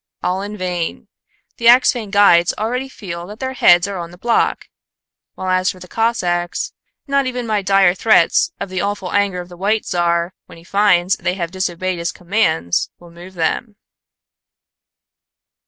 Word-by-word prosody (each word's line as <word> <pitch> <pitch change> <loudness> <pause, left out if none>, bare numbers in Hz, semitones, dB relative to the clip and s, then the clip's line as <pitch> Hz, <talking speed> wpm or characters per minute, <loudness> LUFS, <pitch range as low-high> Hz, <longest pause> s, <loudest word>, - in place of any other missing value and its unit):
All 185 +2 -1
in 205 +1 -6
vain. 180 -3 -4 0.5
The 235 - +1
Axphain 240 -2 +5
guides 195 -4 +4
already 250 +5 -2
feel 175 -8 -7
that 210 +3 -10
their 260 0 -3
heads 175 -7 +5
are 200 -2 -5
on 170 -1 -6
the 175 - -14
block; 235 +5 0 0.7
while 185 - -4
as 185 0 +2
for 185 - -6
the 180 - -11
Cossacks, 180 -6 -1 0.3
not 275 -1 +1
even 250 -1 -3
my 215 -2 0
dire 195 -2 +4
threats 215 - +3
of 200 - -5
the 185 -1 -3
awful 200 -2 -3
anger 200 -3 0
of 175 - -11
the 175 - -12
White 210 +4 0
Czar, 170 0 0
when - - -14
he 165 - -15
finds 185 -1 +2
they 180 - -2
have 170 -3 -4
disobeyed 185 -1 -2
his 170 0 -2
commands, 175 - 0
will 175 -1 -16
move 175 +2 -13
them." 205 +6 -2
185 Hz, 170 wpm, -18 LUFS, 175-210 Hz, 0.7 s, Axphain